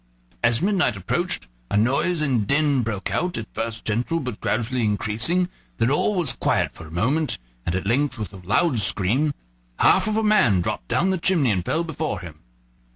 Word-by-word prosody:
As 120 +3 +2
midnight 185 - +2
approached, 90 -8 -2 0.2
a - - +1
noise 140 +9 +2
and 125 -8 +1
din 140 -1 +2
broke 110 -4 -3
out, 180 0 -1
at 110 - -4
first 115 0 -4
gentle, 120 +10 0
but 125 -7 -5
gradually 120 +2 -1
increasing; 110 - +1 0.3
then 115 +3 +2
all 200 +8 +1
was 165 -9 +2
quiet - - 0
for 80 - -11
a - - -13
minute, 130 - 0 0.3
and 85 - 0
at 95 - -2
length, 130 +4 +1
with 105 -2 -6
a - - -9
loud 115 - +1
scream, 105 +10 +2 0.5
half - - +4
of 215 0 0
a 220 - +1
man 165 - +4
dropped - - -3
down 190 +3 +1
the 190 - -1
chimney 165 - +2
and 90 -3 -1
fell 165 - 0
before 160 -2 -3
him. 80 -3 -10
125 Hz, 190 wpm, -23 LUFS, 105-160 Hz, 0.5 s, half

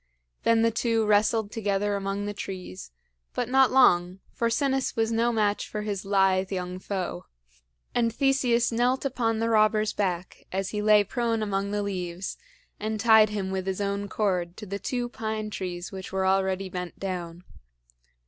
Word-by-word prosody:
Then 230 0 +3
the 230 - +3
two 230 -1 +1
wrestled 210 0 +2
together 205 -2 0
among 200 +1 -2
the 205 - -3
trees, 185 - -7 0.5
but 245 - -1
not 265 +1 +5
long, 180 -8 +4 0.2
for 235 - 0
Sinis 270 +2 0
was 225 0 +1
no 230 +1 +2
match 210 -2 0
for 210 -1 -4
his 205 -2 -3
lithe 195 -1 +2
young 180 -1 -3
foe; 185 - -4 0.7
and 230 -1 +2
Theseus 250 -2 +2
knelt 245 +4 +1
upon 235 -4 0
the 225 +1 0
robber's 215 -1 +3
back 180 -3 -3
as 190 0 -2
he 210 - -2
lay 210 0 +5
prone 230 +1 -1
among 200 -1 -1
the 205 0 -1
leaves, 180 -2 -4 0.4
and 215 +1 -3
tied 220 -1 +6
him 200 -2 -3
with 190 0 -3
his 190 0 -2
own 200 0 -2
cord 180 -5 -1
to 215 - -7
the 200 0 -5
two 245 +1 -2
pine 220 -2 -4
trees 180 -3 -5
which 190 -1 -7
were 190 0 0
already 190 0 +1
bent 180 -1 -6
down. 175 -2 -5
205 Hz, 170 wpm, -27 LUFS, 190-225 Hz, 0.7 s, tied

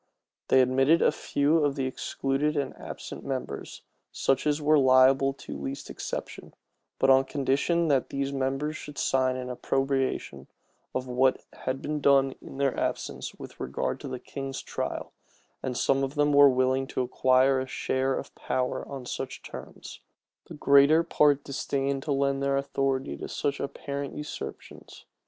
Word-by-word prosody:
They 130 - +6
admitted 135 +6 +3
a - - +5
few 150 +3 +1
of 145 -1 +1
the 135 -2 -1
excluded 135 +3 -1
and 140 -2 -2
absent - - -8
members, 130 - -5 0.3
such 135 +2 +1
as 150 0 +2
were 150 0 +4
liable 130 +1 +5
to 140 - -9
least 135 +1 -6
exception; - - -6 0.4
but 135 - +4
on 135 0 +6
condition 145 +6 +1
that 135 -3 +2
these 140 0 -2
members 135 +3 -1
should 150 -2 -9
sign 130 -1 +1
an 125 0 -4
approbation 135 +1 -1 0.5
of 130 - -1
whatever 130 +1 +2 0.2
had 130 +1 -2
been 150 0 -2
done 135 -1 +4
in - - -10
their 140 -2 +1
absence - - -3
with - - -11
regard - - -2
to - - -7
the 130 -1 -4
king's 135 +1 -6
trial; - - -4 0.5
and 125 -2 -3
some 135 0 +2
of 135 +2 -3
them 145 0 +2
were 145 0 +8
willing 130 +1 +1
to 130 - -1
acquire 130 +1 +3
a 130 - -3
share 130 0 -1
of - - -7
power 130 0 -2
on 135 -3 -7
such - - -5
terms: - - -9 0.5
the - - -9
greater 145 +3 +5
part 145 -4 +3
disdained 140 0 -2
to 150 - -4
lend 140 0 +1
their 140 0 +1
authority 135 - -1
to - - -6
such 140 -1 -2
apparent 140 0 -5
usurpations. 150 0 -8
135 Hz, 160 wpm, -27 LUFS, 130-140 Hz, 0.5 s, were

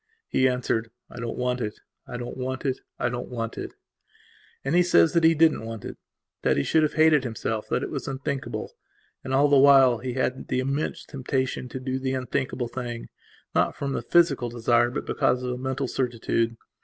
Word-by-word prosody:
He 130 - +3
answered: 125 -3 -1 0.2
"I - - -9
don't 115 -1 -4
want 125 0 -1
it; 105 -2 -3 0.3
I 120 - -5
don't 120 0 -6
want 130 +1 -4
it; 130 -1 0 0.2
I 120 - 0
don't 120 0 -4
want 115 -2 -4
it." - - -6 0.9
And 135 - 0
he 175 - +6
says 175 -1 +4
that 170 -1 +3
he 165 0 +6
didn't 160 -6 +4
want 115 -2 -7
it; - - -6 0.5
that - - +2
he 70 - +1
would 160 - +6
have 155 - 0
hated 155 -3 +5
himself; 110 -2 -3
that 125 - 0
it - - -4
was 140 - -4
unthinkable. 135 0 -4 0.5
And 130 - -5
all 140 +2 +4
the 140 -1 +5
while 135 -4 +7
he 125 +1 -4
had 130 0 -2
the - - 0
immense 140 +3 -2
temptation 130 -1 -2
to 130 - -5
do 130 0 -2
the 130 0 -2
unthinkable 130 -1 -2
thing, 120 -1 -6 0.4
not - - +2
from 140 -1 -3
the - - -2
physical 145 -8 +3
desire 120 0 +2
but 120 - -4
because 125 0 +1
of 125 - -2
a 125 - -3
mental 130 +1 -2
certitude. 115 -2 -1
130 Hz, 205 wpm, -26 LUFS, 120-140 Hz, 0.9 s, while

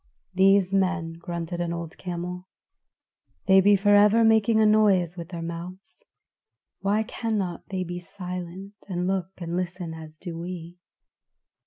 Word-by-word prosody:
"These 195 0 +4
men," 185 -4 +1
grunted 170 0 -4
an 170 -1 -2
old 170 -1 -5
camel, 180 0 -5 1.0
"they 190 0 +6
be 205 +1 +6
forever 205 +3 +5
making 220 0 +4
a 220 - +5
noise 200 -5 +4
with 170 -1 -8
their 170 -2 -6
mouths; 175 +3 -8 0.8
why 205 +3 +1
cannot 210 -6 -3
they 190 -1 -2
be 175 0 -5
silent, 180 +1 -7 0.2
and 180 -1 -2
look 185 -1 -1
and 170 -1 -4
listen 180 -2 -3
as 160 -1 -10
do 165 -1 -7
we?" 175 0 -7
180 Hz, 140 wpm, -26 LUFS, 170-195 Hz, 1.0 s, they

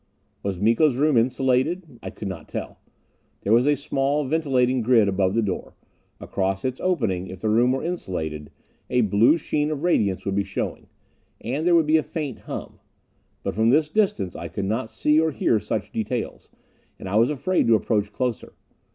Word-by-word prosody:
Was 100 -2 -3
Miko's 115 - +3
room 150 +2 +2
insulated? 130 +5 +1
I - - -6
could 105 - -7
not 90 -5 -7
tell. - - -6 0.6
There 105 - +1
was 120 +4 +4
a 145 - +4
small 140 +1 0
ventilating 130 -4 +1
grid 115 -2 +4
above 95 0 +1
the 115 - +2
door. 95 -3 -4 0.4
Across 95 +1 -2
its 130 0 -3
opening, 110 - 0
if 95 0 -9
the 110 - 0
room 120 +4 +4
were 135 - -1
insulated, 80 - -4 0.4
a 125 - +2
blue 110 - +4
sheen 150 -1 -1
of 155 -1 -4
radiance 100 - +1
would 100 - -1
be 100 +1 +1
showing. 95 +1 -4 0.5
And 140 +8 -2
there 175 - +5
would 165 -2 +4
be 155 +1 +4
a - - +2
faint 150 -5 -5
hum. - - -7 0.6
But - - -2
from 110 +2 +2
this 150 +4 +3
distance 155 - 0
I 85 - -5
could 95 +4 -4
not 110 +3 -2
see 150 +1 +2
or 160 - +2
hear 115 -6 +1
such 105 0 -4
details, 115 +2 -4 0.5
and - - -8
I 100 +3 0
was 115 +2 +4
afraid 175 +6 0
to 115 - +6
approach 105 -1 0
closer. 125 +1 -3
120 Hz, 185 wpm, -24 LUFS, 100-150 Hz, 0.6 s, to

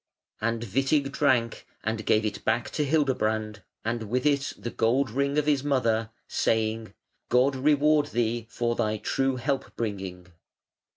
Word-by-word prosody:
And 115 +1 -1
Witig 135 +6 +1
drank 115 -4 +1 0.2
and 110 0 -2
gave 110 0 +3
it 105 - -3
back 115 +2 0
to 150 - 0
Hildebrand, 110 -8 0 0.2
and 115 -2 -2
with 125 +3 0
it 145 -1 +2
the 120 - -5
gold 120 +2 +1
ring 140 +4 0
of 150 - +2
his 145 -3 +2
mother, 115 -6 +1 0.2
saying: 110 0 0 0.3
"God 130 +3 +3
reward 150 +2 +3
thee 115 -2 -1
for 120 0 -1
thy 110 -1 0
true 135 +4 0
help 135 +2 -2
bringing". 95 -5 -5
120 Hz, 150 wpm, -27 LUFS, 110-140 Hz, 0.3 s, gave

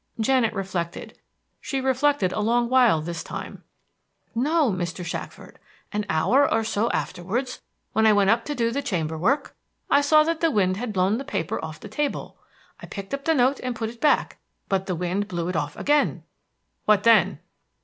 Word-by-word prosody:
Janet 240 0 +2
reflected. 185 -3 -4 0.4
She 270 - -3
reflected 265 -6 +1
a - - -2
long 235 +3 +1
while 245 -11 +4
this 170 0 -5
time. - - -7 0.7
"No, 285 +2 +2
Mr. 175 -1 -4
Shackford: 175 - -7 0.3
an 210 0 -2
hour 255 - +3
or 225 - +2
so 220 +1 0
afterwards, 230 +9 -3 0.3
when 220 0 +4
I 215 - +6
went 200 -1 +4
up 230 0 +2
to 295 - -3
do 230 -2 0
the 280 +4 -1
chamber 165 - -2
work, 260 - 0 0.4
I 285 - +6
saw 305 +2 +5
that 330 +1 -1
the 330 - +4
wind 190 -8 +1
had 240 +1 -3
blow 190 +1 +2
the 265 - -4
paper 270 - -3
off 160 -1 -5
of - - -20
the - - -8
table. 285 +7 -3 0.4
I - - -10
picked 200 +4 -8
up 275 0 -4
the 325 - +3
note 260 +1 +2
and 250 -1 -3
put 225 0 -3
it 235 0 -18
back; 300 - +2 0.3
but 190 -1 0
the 185 - -1
wind 180 +4 -2
blew 175 -3 -3
it 180 - -3
off 150 -2 -2
again." 295 0 +1 0.6
"What 210 -1 +4
then?" 210 -5 +5
220 Hz, 190 wpm, -24 LUFS, 185-265 Hz, 0.7 s, I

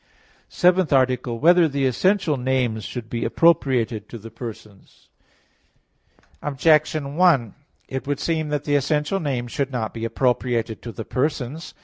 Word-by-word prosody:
_______________________ - - -40 0.5
SEVENTH 180 -1 +2
ARTICLE 130 -2 +2
[I, - - -4
Q. - - -13
39, 165 - +5
Art. 175 - +7
7] - - +6
Whether 160 - +1
the 140 -1 0
Essential 180 - +1
Names 125 -4 -1
Should 120 -3 -6
Be 115 0 -3
Appropriated 125 -10 +2
to 115 - -8
the 115 +1 -11
Persons? 110 -4 -11 1.3
Objection 150 0 +1
1: 155 - +3 0.3
It 135 +1 -5
would 145 -1 -1
seem 160 -2 -1
that 145 -1 -2
the 145 - -2
essential 150 +6 0
names 125 -7 -3
should 140 -1 -2
not 120 -4 -3
be 115 - -6
appropriated 115 -1 -1
to 120 - -7
the 115 - -7
persons. 140 +2 -3
130 Hz, 170 wpm, -22 LUFS, 120-150 Hz, 1.3 s, Art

